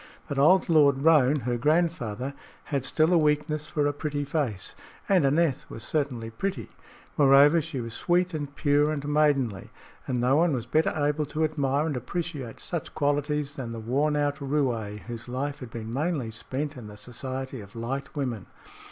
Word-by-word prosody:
But 140 - -2
old 180 +7 +5
Lord 145 -4 +4
Roane, 150 -3 +5
her 120 0 -1
grandfather, 140 -5 0 0.3
had 140 -3 -2
still 155 +5 +2
a 170 - +5
weakness 150 0 0
for 150 -1 0
a 145 - +1
pretty 145 0 -3
face, 135 - -2 0.3
and 190 -5 +4
Aneth 150 -1 +1
was 115 - -7
certainly 125 -7 -2
pretty. 120 - -3 0.5
Moreover, 145 +3 +6
she 155 -3 -5
was 115 -1 -6
sweet 180 +6 +1
and 145 -2 -5
pure 145 0 +3
and 145 -2 -3
maidenly, 140 -9 +1 0.4
and 125 -2 -1
no 125 +3 +3
one 165 -1 +3
was 120 -3 -2
better 155 +6 +2
able 150 0 0
to 155 +2 -1
admire 145 -2 +1
and 155 -4 -2
appreciate 135 -1 -4
such 170 -4 -5
qualities 145 -1 0
than 120 -4 -5
the 115 - -5
worn 140 +7 0
out 145 -1 0
roué 125 -8 -1
whose 120 0 -8
life 140 +3 -3
had 125 - -8
been 115 0 -6
mainly 145 -4 -1
spent 140 +6 -4
in 120 -4 -9
the 105 0 -11
society 130 +2 -6
of 100 +2 -13
light 130 +4 -4
women. 125 -8 -3
145 Hz, 180 wpm, -27 LUFS, 125-150 Hz, 0.5 s, Moreover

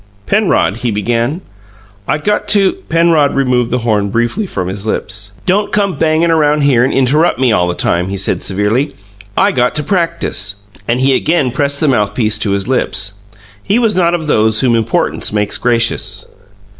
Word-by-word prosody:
"Penrod," 195 - +1
he 120 0 -2
began, 115 - -1 0.7
"I - - +1
got 210 +6 -1
to 205 -1 +4
" - - -30
Penrod 165 -4 +3
removed 125 -3 +1
the 125 - 0
horn 105 -4 0
briefly 120 - -1
from 95 - -4
his 95 +1 -4
lips. - - -3
"Don't 205 +3 +1
come 200 -2 +1
bangin' 160 +1 +1
around 150 -2 +2
here 135 -4 +3
and 130 - +1
interrup' 140 +6 +2
me 130 -2 +2
all 90 -5 +2
the 90 - -2
time," 85 +1 0
he 100 - -3
said 95 - -1
severely. 105 +9 -1 0.4
"I - - +3
got 125 0 0
to 150 - -1
practice." 145 - -2 0.3
And 120 +2 0
he 135 +1 +3
again 155 -5 +1
pressed 140 +2 -1
the 155 - +1
mouthpiece 110 -3 +1
to 105 - -1
his 100 +1 -1
lips. 100 -6 -1 0.4
He 200 - 0
was 225 -5 +1
not 175 -1 +2
of 165 -2 -4
those 110 -6 +2
whom 125 -3 +2
importance 115 -2 -1
makes 105 -1 -1
gracious. 115 -1 0
125 Hz, 180 wpm, -14 LUFS, 110-160 Hz, 0.7 s, to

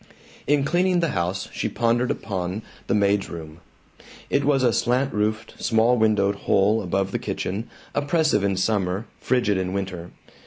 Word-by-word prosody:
In 145 -1 +3
cleaning 180 +4 +2
the 165 -2 +1
house 95 -3 -2
she - - -2
pondered 120 +1 +1
upon 95 +1 -3 0.2
the - - +1
maid's 100 -1 +2
room. 80 -1 -8 0.7
It 140 - +2
was 135 -2 +2
a 120 -2 +3
slant 125 +3 +1
roofed, 110 +1 -2
small 115 +1 +3
windowed 105 -3 +2
hole 105 +3 +4
above 95 +1 -1
the - - -1
kitchen, 100 +5 -4 0.2
oppressive 145 - +2
in 100 -1 +1
summer, 95 0 0
frigid 110 -6 +1
in 95 0 -2
winter. 95 -3 -4
105 Hz, 155 wpm, -24 LUFS, 95-125 Hz, 0.7 s, hole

